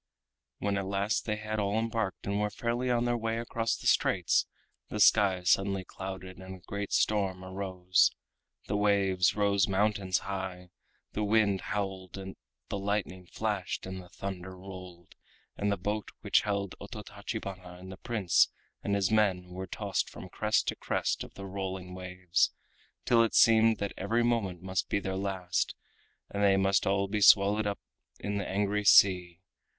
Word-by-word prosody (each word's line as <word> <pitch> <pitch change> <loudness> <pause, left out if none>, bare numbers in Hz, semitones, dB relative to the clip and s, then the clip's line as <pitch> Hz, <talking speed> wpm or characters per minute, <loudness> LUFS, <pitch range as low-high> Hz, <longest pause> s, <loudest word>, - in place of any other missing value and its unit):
When 100 -1 -1
at 95 - -4
last 100 +2 0
they 105 - 0
had 110 0 -4
all 100 +1 0
embarked 115 -3 -2
and 100 +1 -1
were 105 - +1
fairly 120 +4 -2
on 120 -1 +2
their 120 0 +1
way 115 0 -1
across 115 -1 -1
the - - -12
straits, - - +3 0.4
the 105 - -4
sky 100 -3 +5
suddenly 95 +1 +2
clouded 95 -1 -7
and 95 0 -8
a 90 - -17
great 100 0 -4
storm 95 -3 +1
arose. 95 -1 +2 0.6
The 100 - -1
waves 100 -3 +2
rose 100 -3 +2
mountains 100 -2 +1
high, 95 -2 -5 0.4
the 105 - -2
wind 105 -2 +2
howled, 95 -3 -3
the 95 +1 -8
lightning 95 -2 -2
flashed 105 -1 -3
and 95 0 -6
the 90 - -15
thunder 95 -1 -6
rolled, 90 -2 -11 0.4
and 100 0 0
the 100 - 0
boat 105 +3 -3
which - - +3
held 100 -2 -2
Ototachibana 90 -2 -7
and 95 +1 -10
the 95 - -9
Prince 105 -6 +2 0.3
and 100 - 0
his 100 -1 +1
men 95 -5 +2
was 95 +1 -5
tossed 100 -3 -1
from - - -10
crest - - +1
to - - -2
crest - - -1
of - - -12
the 100 - -7
rolling 95 -1 -5
waves, 90 0 0 0.6
till 115 -1 +5
it 115 - +1
seemed 115 -1 +6
that 100 -1 -3
every 115 +5 +1
moment 100 -7 0
must 95 -1 -2
be - - +1
their 95 -1 -3
last 95 -2 -1 0.6
and 100 - -2
that 100 - +5
they 95 0 +4
must 95 -1 +2
all 100 0 +2
be 105 +1 -2
swallowed 100 +2 +6
up 100 - -2 0.4
in 100 0 -3
the 100 - -4
angry 105 +1 0
sea. 90 -3 +5
100 Hz, 170 wpm, -30 LUFS, 95-105 Hz, 0.6 s, seemed